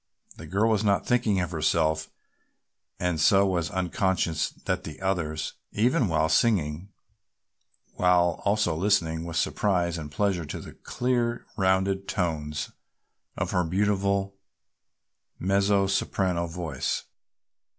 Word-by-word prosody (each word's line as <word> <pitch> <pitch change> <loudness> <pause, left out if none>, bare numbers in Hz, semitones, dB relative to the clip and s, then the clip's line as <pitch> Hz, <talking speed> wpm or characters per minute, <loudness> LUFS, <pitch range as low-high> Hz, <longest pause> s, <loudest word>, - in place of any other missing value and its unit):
The - - -9
girl 100 +7 +2
was 110 -1 +1
not 100 -2 +2
thinking 110 -5 +2
of 90 - -3
herself 80 -1 +1 0.9
and 90 -3 0
so 100 +4 +5
was 85 -3 0
unconscious 95 -3 0
that - - -4
the 75 - -8
others, 80 -5 -2 0.2
even 125 +4 +2
while 80 -2 +2
singing, 80 -1 +1 1.1
were 90 - +2
also 90 +1 +2
listening 85 -3 +1
with 85 -1 -4
surprise 85 -4 0
and 75 -2 -7
pleasure 95 0 0
to - - -5
the - - -10
clear, 120 -1 -1
rounded 95 0 +1
tones 75 -5 -2 0.7
of - - -2
her 90 - +2
beautiful 100 +2 0 1.0
mezzo 100 +1 +2
soprano 95 -2 0
voice. 80 -5 -3
95 Hz, 120 wpm, -26 LUFS, 80-100 Hz, 1.1 s, so